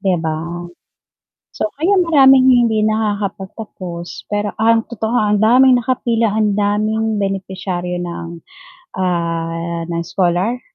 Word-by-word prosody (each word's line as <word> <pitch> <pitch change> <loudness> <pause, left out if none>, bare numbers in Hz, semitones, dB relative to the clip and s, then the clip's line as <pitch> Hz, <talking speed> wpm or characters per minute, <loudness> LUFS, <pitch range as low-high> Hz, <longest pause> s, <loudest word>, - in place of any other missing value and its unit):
'Di 190 -2 +1
ba? 160 -1 -1 1.2
So, 325 - -2
kaya 360 +7 +1
maraming 270 -7 +5 0.2
hindi 215 -1 +1
nakakapagtapos, 200 -4 -4
pero 205 0 -2
ang 225 0 +3
totoo, 235 +1 -2
ang 210 -1 +1
daming 250 +2 +5
nakapila, 235 -2 0
ang 210 -2 +2
daming 215 +2 0
benepisaryo 190 -2 -3
ng, 170 -1 -5 0.7
ah, 170 -1 -2
ng 170 -1 -2
scholar. 185 +7 0
205 Hz, 110 wpm, -17 LUFS, 180-225 Hz, 1.2 s, maraming